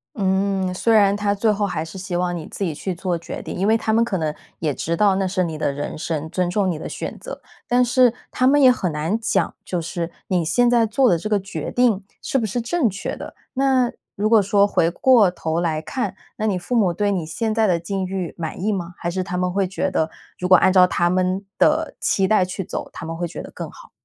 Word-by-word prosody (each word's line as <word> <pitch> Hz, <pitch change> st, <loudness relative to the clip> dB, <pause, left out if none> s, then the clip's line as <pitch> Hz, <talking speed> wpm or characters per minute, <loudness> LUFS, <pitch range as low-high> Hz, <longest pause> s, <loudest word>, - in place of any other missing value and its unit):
嗯， 190 Hz, -2 st, 0 dB
虽 225 Hz, +5 st, +1 dB
然 200 Hz, -2 st, +5 dB
他 205 Hz, 0 st, 0 dB
最 210 Hz, +2 st, +1 dB
后 205 Hz, 0 st, 0 dB
还 160 Hz, -5 st, -3 dB
是 165 Hz, -, -10 dB
希 185 Hz, -1 st, -3 dB
望 175 Hz, 0 st, -1 dB
你 165 Hz, -3 st, -6 dB
自 200 Hz, -, -4 dB
己 165 Hz, -, -2 dB
去 190 Hz, +5 st, -3 dB
做 175 Hz, 0 st, -2 dB
决 170 Hz, -, -7 dB
定 -, -, -6 dB
因 190 Hz, -, -1 dB
为 220 Hz, +2 st, +4 dB
他 220 Hz, -1 st, -1 dB
们 230 Hz, +1 st, +4 dB
可 220 Hz, -5 st, -1 dB
能 155 Hz, -3 st, -1 dB, 0.3 s
也 155 Hz, -3 st, 0 dB
知 170 Hz, +5 st, -2 dB
道 200 Hz, -1 st, +4 dB
那 195 Hz, 0 st, 0 dB
是 185 Hz, 0 st, 0 dB
你 160 Hz, -2 st, -4 dB
的 150 Hz, -, 0 dB
人 145 Hz, +1 st, -5 dB
生， 160 Hz, 0 st, -3 dB
尊 180 Hz, +1 st, -1 dB
重 195 Hz, 0 st, +1 dB
你 170 Hz, -, -2 dB
的 -, -, -6 dB
选 -, -, -5 dB
择。 -, -, -8 dB, 0.3 s
但 245 Hz, +1 st, +3 dB
是 245 Hz, -1 st, +4 dB, 0.2 s
他 255 Hz, -, 0 dB
们 285 Hz, +3 st, +5 dB
也 260 Hz, -, +8 dB
很 185 Hz, -8 st, -1 dB
难 155 Hz, +7 st, -1 dB
讲， 225 Hz, -, 0 dB
就 180 Hz, -2 st, -3 dB
是 170 Hz, +1 st, -4 dB, 0.2 s
你 180 Hz, -3 st, +1 dB
现 240 Hz, +10 st, +3 dB
在 235 Hz, -1 st, +4 dB
做 245 Hz, +4 st, +3 dB
的 175 Hz, -, +3 dB
这 195 Hz, +6 st, -5 dB
个 210 Hz, -1 st, +2 dB
决 195 Hz, +1 st, -5 dB
定， 235 Hz, -5 st, +2 dB, 0.2 s
是 270 Hz, -, -1 dB
不 230 Hz, -, 0 dB
是 215 Hz, +4 st, -2 dB
正 250 Hz, +2 st, +1 dB
确 200 Hz, +1 st, -5 dB
的？ -, -, -9 dB, 0.2 s
那 260 Hz, -2 st, +2 dB, 0.3 s
如 210 Hz, +2 st, 0 dB
果 225 Hz, -2 st, +6 dB
说 200 Hz, 0 st, +3 dB
回 165 Hz, -4 st, +2 dB
过 220 Hz, -1 st, +4 dB
头 165 Hz, -1 st, -2 dB
来 160 Hz, -3 st, -1 dB
看， 245 Hz, +10 st, -3 dB, 0.2 s
那 215 Hz, -, -3 dB
你 205 Hz, -4 st, +1 dB
父 180 Hz, +8 st, -3 dB
母 205 Hz, -6 st, +3 dB
对 205 Hz, +3 st, 0 dB
你 180 Hz, -5 st, -1 dB
现 215 Hz, +7 st, -2 dB
在 225 Hz, -1 st, +3 dB
的 180 Hz, -4 st, +2 dB
境 190 Hz, +3 st, -3 dB
遇 185 Hz, -2 st, -4 dB
满 165 Hz, +1 st, -5 dB
意 210 Hz, +2 st, +1 dB
吗？ 175 Hz, -2 st, -4 dB
还 170 Hz, -, -3 dB
是 185 Hz, +2 st, -2 dB
他 180 Hz, 0 st, -4 dB
们 180 Hz, 0 st, 0 dB
会 195 Hz, 0 st, +1 dB
觉 190 Hz, +1 st, -2 dB
得， 160 Hz, -3 st, 0 dB, 0.3 s
如 180 Hz, 0 st, -3 dB
果 185 Hz, -, +9 dB
按 185 Hz, +2 st, +4 dB
照 185 Hz, -1 st, +7 dB
他 175 Hz, -1 st, +1 dB
们 185 Hz, +2 st, 0 dB
的 -, -, +2 dB
期 190 Hz, -1 st, +2 dB
待 215 Hz, -2 st, +4 dB
去 185 Hz, +1 st, -4 dB
走， -, -, -5 dB
他 -, -, -8 dB
们 165 Hz, 0 st, -5 dB
会 175 Hz, +1 st, -2 dB
觉 -, -, -7 dB
得 -, -, -9 dB
更 -, -, -7 dB
好？ -, -, -15 dB
190 Hz, 275 characters per minute, -21 LUFS, 175-215 Hz, 0.3 s, 果